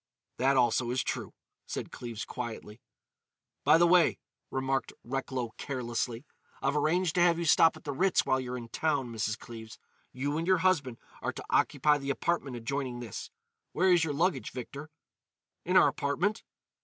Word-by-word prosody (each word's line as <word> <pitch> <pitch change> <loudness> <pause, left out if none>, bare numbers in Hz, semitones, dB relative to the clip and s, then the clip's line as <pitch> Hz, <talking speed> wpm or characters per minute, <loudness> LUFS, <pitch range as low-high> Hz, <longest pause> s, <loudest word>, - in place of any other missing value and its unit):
"That 135 +2 +3
also 120 -1 +3
is 125 +1 0
true," - - -4 0.3
said - - -5
Cleves 115 -2 -6
quietly. 115 -2 -7 0.8
"By 150 +3 +6
the 175 - +5
way," 175 -1 +5 0.3
remarked 135 0 -1
Recklow 130 -2 -3
carelessly, 120 -1 -3 0.3
"I've 140 +2 0
arranged 160 +3 +2
to 175 - +2
have 170 -1 +5
you 170 - -2
stop 165 0 +5
at 155 - -16
the 145 - -3
Ritz 185 +8 +2
while 130 - +2
you're 125 -1 -4
in 115 -1 -8
town, 140 -2 0
Mrs. 110 -1 -1
Cleves. 110 -2 -10 0.3
You 145 +4 -2
and 165 - -3
your 185 0 +5
husband 145 -10 +2 0.2
are - - -2
to - - -8
occupy 150 -1 +3
the 140 0 -5
apartment 140 -2 -1
adjoining 125 +1 -3
this. 120 -4 -6 0.4
Where 185 0 +4
is 170 -2 +4
your 155 -2 -1
luggage, 175 +5 +1
Victor?" 140 +4 -7 0.8
"In - - +3
our - - +7
apartment." 180 +10 -1
135 Hz, 170 wpm, -30 LUFS, 120-160 Hz, 0.8 s, our